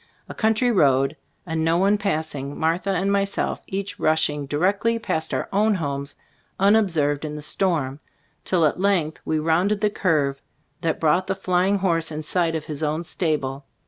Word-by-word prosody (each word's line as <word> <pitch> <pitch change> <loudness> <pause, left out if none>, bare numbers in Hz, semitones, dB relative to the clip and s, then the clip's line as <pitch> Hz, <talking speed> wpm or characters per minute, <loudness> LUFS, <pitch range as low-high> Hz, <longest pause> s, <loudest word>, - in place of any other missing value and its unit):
A - - -7
country 225 +2 +2
road 135 - +3 0.3
and 160 -2 -2
no 165 +1 +2
one 200 +3 +3
passing. 155 -7 -3
Martha 165 +5 0
and 195 +1 +1
myself 200 0 -1
each 195 +1 -4
rushing 150 -2 +1
di 145 - -2
rectly 205 +7 +1
past 160 -7 -2
our - - -2
own 210 +2 +3
homes 140 -4 -3 0.4
unobserved 175 -9 +2
in 150 -1 -4
the 150 - -6
storm, 150 -6 -1 0.4
till 175 -4 +2
at 150 - 0
length 185 -6 +1
we 155 - 0
rounded 170 +7 +1
the 210 -1 +2
curve 145 -9 0 0.4
that 160 -2 -1
brought 165 +4 +2
the 190 - 0
flying 190 +1 +1
horse 170 -4 +1
in 155 0 -5
sight 165 0 0
of 155 - -4
his 150 -1 -5
own 155 +2 -1
stable. 145 -5 -2
165 Hz, 175 wpm, -23 LUFS, 150-195 Hz, 0.4 s, road